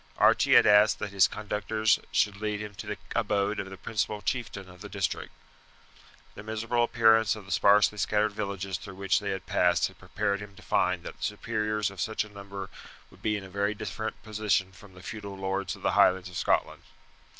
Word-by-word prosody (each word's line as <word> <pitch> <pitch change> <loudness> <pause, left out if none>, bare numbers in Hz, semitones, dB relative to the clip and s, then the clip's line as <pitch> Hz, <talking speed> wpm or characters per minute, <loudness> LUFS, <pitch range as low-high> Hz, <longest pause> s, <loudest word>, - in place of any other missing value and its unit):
Archie - - +5
had - - +8
asked 105 +1 +6
that 105 - -5
his 100 -1 +5
conductors 105 +1 0
should 100 -2 +2
lead 105 -1 -1
him 105 0 -6
to 100 - -9
the - - -3 0.2
abode 100 +1 0
of 95 - -4
the 95 - -9
principal 105 +1 -2
chieftain 105 -5 -3
of 90 0 -15
the 105 - -8
district. 95 -6 -2 1.0
The - - -9
miserable 110 +2 -1
appearance 110 -2 +4
of 105 -3 -10
the 100 - -10
sparsely 105 +3 +4
scattered 105 +1 +1
villages 100 -2 -4
through 100 -2 -10
which 100 0 +1
they 100 -1 -4
had 95 -1 -4
passed 90 -2 +2
had - - -19
prepared 100 -1 -1
him 105 -1 -10
to - - -15
find 90 -1 +1
that - - -8
the - - -10
superiors 105 -1 -1
of 95 -2 -7
such 110 -1 -1
a 110 - -12
people 100 -1 -8 0.4
would - - -19
be 105 -1 0
in 100 - -7
a - - -9
very 100 +2 0
different 110 +1 -5
position 105 -3 0
from 95 +1 -16
the 90 - -13
feudal 100 -2 -7
lords 95 0 -2
of - - -16
the - - +2
Highlands 95 0 +4
of 90 - -12
Scotland. 85 - 0
100 Hz, 205 wpm, -28 LUFS, 95-105 Hz, 1.0 s, had